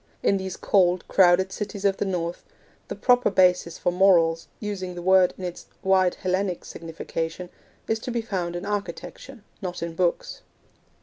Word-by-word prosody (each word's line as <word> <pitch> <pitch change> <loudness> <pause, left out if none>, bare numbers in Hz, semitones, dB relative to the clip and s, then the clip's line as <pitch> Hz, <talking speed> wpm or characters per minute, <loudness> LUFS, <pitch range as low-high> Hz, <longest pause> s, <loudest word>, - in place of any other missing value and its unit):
In 195 - +3
these 190 -1 -5
cold, 180 -2 +2
crowded 190 0 +4
cities 205 0 -5
of 195 -1 +2
the - - -1
North, 175 -2 -3 0.4
the - - -5
proper 250 0 +3
basis 180 -3 +3
for 180 - 0
morals, 170 -3 +3
using 190 -4 -5
the 175 - -6
word 185 0 +4
in 185 - -8
its 175 -1 -6 0.2
wide 190 -1 +3
Hellenic 185 -1 -2
signification, 165 +1 -5 0.4
is 225 0 0
to 240 - -6
be 235 -1 -2
found 180 -5 -3
in 175 +3 -5
architecture, 205 +4 -6 0.2
not 180 -3 -4
in 170 -1 -4
books. 175 +1 -1
185 Hz, 165 wpm, -25 LUFS, 175-195 Hz, 0.4 s, crowded